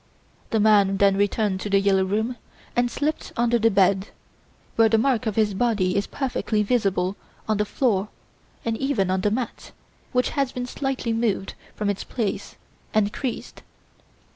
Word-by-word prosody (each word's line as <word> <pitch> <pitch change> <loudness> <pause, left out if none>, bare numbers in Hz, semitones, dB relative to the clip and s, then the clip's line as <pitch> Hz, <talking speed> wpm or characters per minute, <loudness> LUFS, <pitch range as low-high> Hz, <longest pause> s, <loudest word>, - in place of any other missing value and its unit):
The 225 - +1
man 205 -2 +4
then 195 0 +4
returned 205 -1 +1
to 210 - -4
"The 195 0 +4
Yellow 195 -1 +3
Room" 220 +6 -1 0.4
and 245 0 +2
slipped 295 +6 -2
under 235 0 +2
the 225 +1 +4
bed, 195 0 +3 0.7
where 225 -1 +5
the 225 - +4
mark 245 0 +1
of 215 - -1
his 215 -2 +2
body 195 -4 +1
is 200 0 0
perfectly 245 -5 -1
visible 195 -4 +1 0.3
on 215 -1 +1
the 210 - +1
floor 210 -4 0 0.6
and 230 -1 0
even 235 -9 0
on 190 0 +1
the 210 - +2
mat, 235 +3 -4 0.4
which 250 -1 +1
has 275 -3 0
been 250 0 -3
slightly 255 -2 -2
moved 225 -4 -1 0.2
from 210 - -2
its 205 -1 -1
place 220 -5 -3 0.4
and 210 0 +2
creased. 255 -4 -5
215 Hz, 165 wpm, -24 LUFS, 200-240 Hz, 0.7 s, where